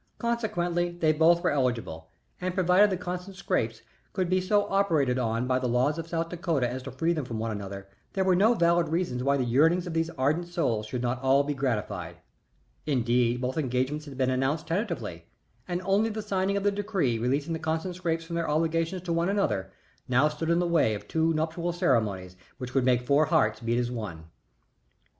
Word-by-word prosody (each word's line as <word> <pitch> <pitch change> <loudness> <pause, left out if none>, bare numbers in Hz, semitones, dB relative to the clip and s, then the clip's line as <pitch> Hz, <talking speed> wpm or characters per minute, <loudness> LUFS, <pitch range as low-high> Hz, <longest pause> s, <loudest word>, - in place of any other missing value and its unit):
Consequently, 175 -8 -1
they 175 -2 +1
both 165 +3 +4
were - - +2
eligible, 120 - -2 0.3
and 185 0 -2
provided 185 +2 +5
the 190 - -1
Constant 180 +2 -6
Scrappes 115 -11 -1 0.3
could 185 -2 -1
be 185 0 +3
so 205 +2 +2
operated 160 -11 +2
on 115 0 0
by 130 0 +1
the 130 - -1
laws 130 +6 +1
of 165 - -5
South 165 0 -2
Dakota 165 -7 0
as 125 +2 -5
to 135 +1 -7
free 165 +7 0
them 155 -3 -2
from 120 -3 -5
one 110 +1 -2
another, 100 -1 -6 0.3
there 190 - +1
were 185 -1 +3
no 215 +6 +4
valid 170 -2 +3
reasons 160 -7 -1
why 140 +1 +2
the 130 - 0
yearnings 160 +9 +3
of 175 - -5
these 165 0 0
ardent 155 +6 +1
souls 120 -11 -1
should 125 +2 -4
not 125 +1 -1
all 135 +1 +4
be 145 +1 -2
gratified. 105 -10 -3 0.7
Indeed, 125 -2 +1
both 130 +4 -1
engagements 135 +2 -1
had 140 -3 -10
been 130 -1 +1
announced 135 +5 0
tentatively, 160 - -3 0.4
and 180 0 -3
only 200 +4 +2
the 215 0 -4
signing 195 -1 0
of 200 - -2
the 205 - +3
decree 195 - -1
releasing 140 +7 0
the 160 - -3
Constant 160 +3 -2
Scrappes 165 -2 -2
from 170 +1 -6
their 170 -2 -1
obligations 165 +3 0
to 170 -2 -2
one 170 +2 +1
another 145 - 0 0.4
now 130 +4 +4
stood 155 +2 -4
in 170 - +3
the 175 - +1
way 160 -11 +2
of 100 - -9
two 160 0 +1
nuptial 165 +2 -1
ceremonies 105 - 0 0.2
which 125 -1 -7
would 135 -2 +2
make 125 -1 +2
four 145 +3 +4
hearts 110 -7 +2
beat 115 +1 -1
as 120 0 -1
one. 105 -8 -5
Mrs. 65 -6 -28
155 Hz, 205 wpm, -27 LUFS, 125-175 Hz, 0.7 s, provided